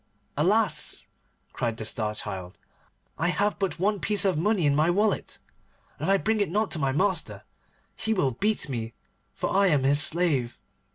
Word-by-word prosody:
'Alas!' 205 Hz, +9 st, +2 dB, 0.5 s
cried 115 Hz, -2 st, -2 dB
the 110 Hz, -, -5 dB
Star 105 Hz, -1 st, -1 dB
Child, 95 Hz, -2 st, -6 dB, 0.6 s
'I 165 Hz, -, +1 dB
have 205 Hz, +3 st, 0 dB
but 195 Hz, -2 st, -2 dB
one 200 Hz, +3 st, 0 dB
piece 205 Hz, 0 st, +2 dB
of 190 Hz, -, +2 dB
money 185 Hz, +2 st, +1 dB
in 140 Hz, -1 st, +3 dB
my 155 Hz, +3 st, +2 dB
wallet, 205 Hz, +4 st, 0 dB, 0.6 s
and -, -, -2 dB
if -, -, +4 dB
I 195 Hz, -, +5 dB
bring 215 Hz, +2 st, 0 dB
it 200 Hz, -, 0 dB
not 210 Hz, +4 st, -1 dB
to 160 Hz, -, -1 dB
my 135 Hz, -2 st, 0 dB
master 185 Hz, +6 st, -1 dB, 0.5 s
he 220 Hz, -, -3 dB
will 165 Hz, -11 st, +1 dB
beat 205 Hz, -, -1 dB
me, 115 Hz, -4 st, -5 dB, 0.4 s
for -, -, -3 dB
I 195 Hz, +1 st, +3 dB
am 150 Hz, -6 st, +2 dB
his 140 Hz, +2 st, +4 dB
slave. 155 Hz, -7 st, +2 dB
175 Hz, 180 wpm, -26 LUFS, 135-205 Hz, 0.6 s, I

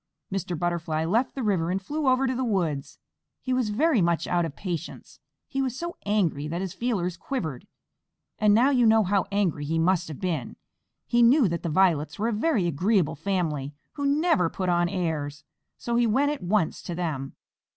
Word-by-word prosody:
Mr. 180 Hz, -3 st, -2 dB
Butterfly 170 Hz, -2 st, -1 dB
left 225 Hz, +10 st, +1 dB
the 265 Hz, -, -3 dB
river 185 Hz, -6 st, +1 dB
and 185 Hz, +2 st, 0 dB
flew 290 Hz, +9 st, -3 dB
over 260 Hz, +1 st, +3 dB
to 260 Hz, -, 0 dB
the 260 Hz, +1 st, -2 dB
woods. 170 Hz, -, -1 dB, 0.4 s
He 255 Hz, -, -2 dB
was 255 Hz, -4 st, +1 dB
very 260 Hz, -, +2 dB
much 170 Hz, -1 st, +1 dB
out 175 Hz, -1 st, +1 dB
of 155 Hz, -3 st, -6 dB
patience. 175 Hz, -4 st, -6 dB, 0.3 s
He 270 Hz, -, -2 dB
was 260 Hz, -2 st, -2 dB
so 345 Hz, +3 st, -5 dB
angry 170 Hz, -8 st, +1 dB
that 170 Hz, +3 st, -3 dB
his 190 Hz, -2 st, -4 dB
feelers 195 Hz, -8 st, -1 dB
quivered, 165 Hz, -, -5 dB, 0.7 s
and 210 Hz, -1 st, +4 dB
now 240 Hz, +7 st, +5 dB
you 245 Hz, -4 st, +4 dB
know 220 Hz, 0 st, +5 dB
how 195 Hz, 0 st, +1 dB
angry 190 Hz, -7 st, 0 dB
he 160 Hz, +3 st, -1 dB
must 175 Hz, +2 st, +2 dB
have 155 Hz, -4 st, -8 dB
been. 165 Hz, -9 st, -3 dB, 0.5 s
He 240 Hz, -, +2 dB
knew 240 Hz, +1 st, +6 dB
that 170 Hz, 0 st, -3 dB
the 170 Hz, -, -3 dB
Violets 160 Hz, -3 st, +2 dB
were 220 Hz, +3 st, 0 dB
a -, -, -1 dB
very 220 Hz, -, +1 dB
agreeable 175 Hz, +2 st, +1 dB
family, 155 Hz, -5 st, -2 dB, 0.2 s
who 285 Hz, -1 st, -2 dB
never 285 Hz, -, +2 dB
put 185 Hz, +1 st, -3 dB
on 175 Hz, 0 st, +2 dB
airs, 155 Hz, -6 st, -3 dB, 0.3 s
so 235 Hz, -, -3 dB
he 240 Hz, -1 st, +3 dB
went 275 Hz, +6 st, +2 dB
at 295 Hz, -, -5 dB
once 180 Hz, -2 st, 0 dB
to 175 Hz, -, -5 dB
them. 155 Hz, -6 st, -3 dB
185 Hz, 195 wpm, -26 LUFS, 165-235 Hz, 0.7 s, knew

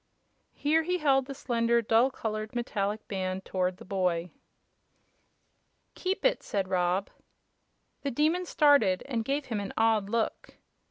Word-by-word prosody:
Here 310 Hz, +3 st, +2 dB
he 360 Hz, +3 st, -1 dB
held 270 Hz, -5 st, +2 dB
the 275 Hz, -, -6 dB
slender, 235 Hz, -3 st, +1 dB
dull 230 Hz, +4 st, +4 dB
colored 215 Hz, -3 st, -4 dB
metallic 215 Hz, -3 st, -2 dB
band 185 Hz, -1 st, -3 dB
toward 185 Hz, -1 st, -1 dB
the -, -, -12 dB
boy. 180 Hz, -3 st, -1 dB, 1.6 s
"Keep 380 Hz, +4 st, -3 dB
it," -, -, +3 dB
said 195 Hz, -2 st, -2 dB
Rob. 180 Hz, +1 st, 0 dB, 0.9 s
The 280 Hz, -, -2 dB
Demon 315 Hz, +7 st, +1 dB
started, 280 Hz, -, +4 dB
and 240 Hz, -5 st, -2 dB
gave 275 Hz, +4 st, -1 dB
him 220 Hz, -4 st, -3 dB
an 200 Hz, -1 st, -5 dB
odd 220 Hz, -3 st, +2 dB
look. 230 Hz, 0 st, -2 dB
225 Hz, 140 wpm, -29 LUFS, 195-275 Hz, 1.6 s, dull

